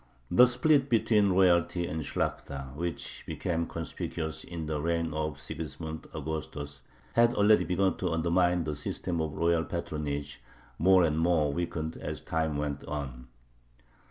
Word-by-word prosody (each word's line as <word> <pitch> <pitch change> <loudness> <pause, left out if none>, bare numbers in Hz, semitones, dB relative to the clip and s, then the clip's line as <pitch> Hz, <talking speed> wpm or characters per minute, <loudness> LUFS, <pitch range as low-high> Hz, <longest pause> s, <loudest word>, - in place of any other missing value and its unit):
The 125 +8 +8
split 135 +3 +3
between 110 -3 +4
royalty 90 -2 +3
and 80 -1 -3
Shlakhta, 70 -2 -3
which 85 0 -4
became 85 -2 -2
conspicuous 80 -1 -4
in 85 -2 -6
the 75 -1 -2
reign 85 0 0
of 75 -2 -2
Sigismund 80 +3 -6
Augustus, 70 -2 -5 0.3
had 120 0 +4
already 105 +1 +5
begun 95 0 +1
to 90 - -1
undermine 85 +1 +2
the 75 -1 -3
system 80 +3 -3
of 80 -2 -2
royal 85 0 +2
patronage, 75 -4 -4 0.4
more 95 +2 +6
and 80 -1 +1
more 80 -4 +2
weakened 80 -1 -3
as - - -5
time 80 -2 -1
went 75 -1 -2
on. 65 -4 -5
80 Hz, 140 wpm, -29 LUFS, 75-90 Hz, 0.4 s, The